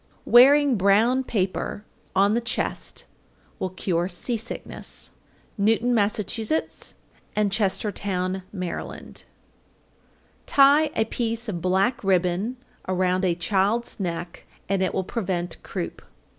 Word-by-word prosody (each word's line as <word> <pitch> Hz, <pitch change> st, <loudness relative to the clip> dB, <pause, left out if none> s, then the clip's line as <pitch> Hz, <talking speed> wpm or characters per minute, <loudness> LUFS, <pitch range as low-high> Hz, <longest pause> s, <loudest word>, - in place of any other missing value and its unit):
_ -, -, -38 dB
805. -, -, -14 dB
Wearing 275 Hz, +2 st, +7 dB
brown 215 Hz, +7 st, +3 dB
paper 205 Hz, -1 st, -2 dB, 0.3 s
on 200 Hz, +2 st, +4 dB
the 235 Hz, -, +1 dB
chest 230 Hz, -1 st, -2 dB, 0.5 s
will 185 Hz, -, -1 dB
cure 175 Hz, -1 st, -1 dB
sea 195 Hz, +7 st, -1 dB
sickness. 225 Hz, +1 st, -5 dB, 0.5 s
Newton, 225 Hz, +4 st, +3 dB
Mass., 210 Hz, -2 st, +2 dB
and 210 Hz, -4 st, -2 dB, 1.2 s
Chestertown, 190 Hz, -2 st, -1 dB
Md. 185 Hz, -3 st, -5 dB
806. 175 Hz, -, -6 dB, 1.2 s
Tie 285 Hz, +3 st, +6 dB
a 220 Hz, -, +2 dB
piece 230 Hz, 0 st, -2 dB
of 175 Hz, -6 st, -3 dB
black 195 Hz, +7 st, +1 dB
ribbon 190 Hz, +5 st, +1 dB, 0.3 s
around 185 Hz, 0 st, +1 dB
a 175 Hz, -2 st, +2 dB
child's 200 Hz, +7 st, 0 dB
neck, 175 Hz, -2 st, -5 dB, 0.2 s
and 195 Hz, 0 st, 0 dB
it 185 Hz, -, 0 dB
will 190 Hz, -, 0 dB
prevent 180 Hz, -5 st, -3 dB
croup. -, -, -5 dB
200 Hz, 120 wpm, -24 LUFS, 185-230 Hz, 1.2 s, Wearing